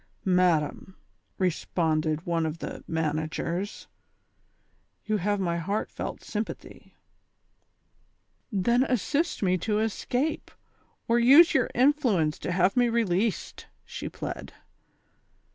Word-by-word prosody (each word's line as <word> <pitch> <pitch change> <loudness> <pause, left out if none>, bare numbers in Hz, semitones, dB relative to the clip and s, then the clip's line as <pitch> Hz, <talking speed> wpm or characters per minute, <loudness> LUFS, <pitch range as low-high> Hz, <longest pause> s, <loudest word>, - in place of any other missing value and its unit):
"Madam," 180 -1 +1 0.4
responded 160 -3 0
one 170 -1 0
of 160 0 -2
the - - -7
managers, 160 +4 -3 1.2
"you 215 -1 +1
have 205 +1 0
my 170 -3 0
heartfelt 200 +6 -4
sympathy." 215 +1 -6 1.6
"Then 235 +5 +2
assist 280 - -1
me 185 -1 +2
to 210 +4 -1
escape, 245 +7 -1 0.6
or 235 +1 +3
use 280 +8 +7
your 260 - +2
influence 240 - +2
to - - -3
have 180 +2 +2
me 245 -1 +3
released," 220 -2 -1 0.2
she - - -6
pled. - - -7
195 Hz, 100 wpm, -27 LUFS, 170-235 Hz, 1.6 s, use